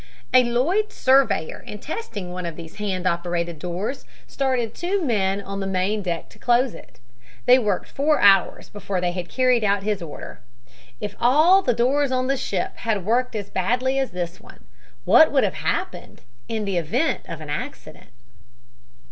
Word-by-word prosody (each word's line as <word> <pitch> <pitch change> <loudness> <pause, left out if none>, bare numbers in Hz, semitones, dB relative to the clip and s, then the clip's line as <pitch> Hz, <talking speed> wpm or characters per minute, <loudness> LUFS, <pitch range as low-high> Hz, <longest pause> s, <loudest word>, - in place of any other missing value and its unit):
"A 255 - +7
Lloyds 320 - 0
surveyor 260 -11 +2
in 210 - -9
testing 210 - -6
one 180 -1 -4
of 165 - -6
these 165 -1 -11
hand 190 -3 -3
operated 170 -2 -1
doors 180 - -4 0.2
started 255 -4 -1
two 375 +4 -1
men 200 -7 +1
on 195 0 -6
the 195 - -3
main 190 +3 0
deck 175 -3 -3
to - - -19
close 245 0 +2
it. - - -14 0.5
They 250 +1 +7
worked 210 -6 -1
four 300 +2 +1
hours 195 -2 +4
before 200 -2 -4
they 180 0 0
had 175 -1 -5
carried 255 -3 +2
out 200 -1 +1
his 210 -2 -1
order. 160 -4 -8 0.6
If 205 -1 -5
all 310 +11 +5
the 245 -10 +1
doors 270 +4 +2
on 255 0 0
the 270 +1 +1
ship 195 -8 -3
had 210 -5 -2
worked 240 +2 +1
as 205 -2 -5
badly 250 +8 0
as 270 - 0
this 175 0 -5
one, - - -17 0.4
what - - +6
would - - +3
have - - 0
happened - - -3 0.3
in 215 -2 -3
event 195 - 0
of 165 - -6
accident?" 150 -6 -7
210 Hz, 170 wpm, -23 LUFS, 180-255 Hz, 0.6 s, A